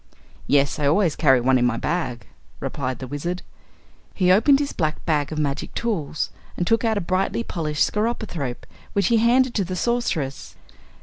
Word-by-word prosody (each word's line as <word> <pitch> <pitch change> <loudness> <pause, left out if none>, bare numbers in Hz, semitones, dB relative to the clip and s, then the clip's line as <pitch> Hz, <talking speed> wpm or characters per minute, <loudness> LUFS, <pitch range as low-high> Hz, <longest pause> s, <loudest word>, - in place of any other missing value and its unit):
"Yes, 140 +2 +2
I 145 - +2
always 165 +1 +3
carry 135 -5 +4
one 130 +1 +3
in 125 - +2
my 120 -1 0
bag," 130 -8 -2 0.3
replied 130 -3 -3
the 130 - -6
Wizard. 170 +7 -4 0.7
He 180 -2 +3
opened 225 +9 +6
his 285 -1 -2
black 155 -2 -2
bag 150 -3 0
of 155 - -4
magic 145 -2 -2
tools 170 -11 -2 0.3
and 175 - 0
took 225 +6 +2
out 220 -2 +1
a - - 0
brightly 185 +6 0
polished 155 -7 0
skeropythrope, 210 - -3 0.3
which 200 +2 +2
he 235 - +4
handed 240 +2 +3
to 200 - +1
the 185 0 -4
Sorceress. 180 - -2
170 Hz, 175 wpm, -23 LUFS, 140-215 Hz, 0.7 s, opened